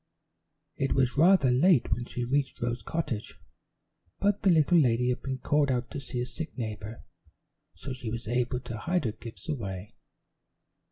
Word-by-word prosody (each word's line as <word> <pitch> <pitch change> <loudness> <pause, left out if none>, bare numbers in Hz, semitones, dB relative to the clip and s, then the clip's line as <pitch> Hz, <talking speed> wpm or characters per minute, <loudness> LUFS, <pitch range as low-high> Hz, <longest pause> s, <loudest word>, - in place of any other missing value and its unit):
It 135 - +1
was 130 -2 +2
rather 160 -3 +5
late 140 +1 +4
when 120 - -3
she 120 -1 -4
reached 140 +2 0
Rose 120 0 -2
Cottage, 120 -4 -3 0.8
but 205 0 +1
the 195 - +3
little 170 0 +5
lady 125 -3 +3
had 125 - -1
been 130 -1 -3
called 145 +2 +2
out 125 -1 -1
to - - -4
see 125 -2 -5
a 120 - 0
sick 145 +7 -7
neighbor, 110 -1 -5 0.7
so 135 - -6
she 125 -3 -5
was 115 0 -5
able 125 +1 0
to 115 -3 -6
hide 175 0 0
her 110 - +1
gifts 115 +7 -11
away. 100 - -4
125 Hz, 170 wpm, -29 LUFS, 120-145 Hz, 0.8 s, rather